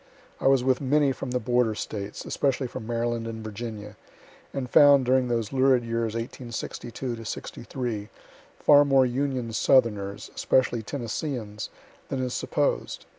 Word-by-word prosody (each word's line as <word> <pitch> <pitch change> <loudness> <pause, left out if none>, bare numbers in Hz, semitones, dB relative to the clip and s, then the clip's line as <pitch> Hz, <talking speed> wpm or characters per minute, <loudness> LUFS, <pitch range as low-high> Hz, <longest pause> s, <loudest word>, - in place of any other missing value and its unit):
I - - +1
was 135 -2 +4
with 130 +1 +2
many 140 +1 +3
from 135 0 -5
the 125 0 0
border 120 -1 +1
States, 105 -1 -5
especially 135 -1 0
from 110 -2 -7
Maryland 120 -1 -1
and 110 -1 -6
Virginia, 110 -1 -7 0.5
and 135 -2 -3
found, 140 0 +6
during 130 0 +3
those 115 -2 -1
lurid 130 -2 +4
years 115 -1 -1
1862 120 0 -5
63, 115 -1 -5 0.5
far 145 -1 +6
more 135 -2 +4
Union 125 -2 -2
southerners, 105 -6 +2
especially 125 -3 +1
Tennesseans, 115 -2 -4 0.4
than 135 - -2
is 125 -1 -2
supposed. - - -1
120 Hz, 135 wpm, -26 LUFS, 115-130 Hz, 0.5 s, found